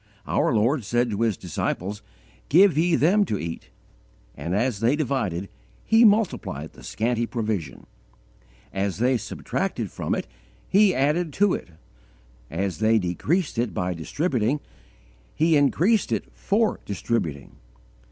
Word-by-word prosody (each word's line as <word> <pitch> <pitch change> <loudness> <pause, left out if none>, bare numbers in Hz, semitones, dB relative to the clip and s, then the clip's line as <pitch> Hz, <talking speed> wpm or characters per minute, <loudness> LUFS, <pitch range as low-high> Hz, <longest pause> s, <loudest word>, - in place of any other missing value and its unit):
Our - - +1
Lord 120 +4 +2
said 120 +3 0
to 105 +2 -2
His 115 -4 +1
disciples: 95 +3 -3 0.5
"Give 180 +1 +6
ye 165 +2 +3
them 195 +7 +4
to 105 - -2
eat," 85 -2 -6 0.6
and 85 +8 -3
as 115 0 0
they 120 +5 +3
divided, 120 - -1 0.4
He 225 +1 +5
multiplied 205 - +1
the - - -15
scanty 120 +1 -1
provision; 105 - -3 0.9
as 95 -1 -1
they 125 +4 +2
subtracted 120 - -3
from - - -2
it - - -3 0.4
He 200 -1 +4
added 150 +5 +1
to 205 -1 +3
it; - - -4 0.8
as 95 +2 -3
they 110 +1 +4
decreased 120 - -1
it 115 -7 -1
by 90 0 -1
distributing, 125 - -1 0.8
He 160 +1 +3
increased 175 +9 +3
it - - -2
for 210 +2 0
distributing. 90 - -3
120 Hz, 130 wpm, -24 LUFS, 100-160 Hz, 0.9 s, Give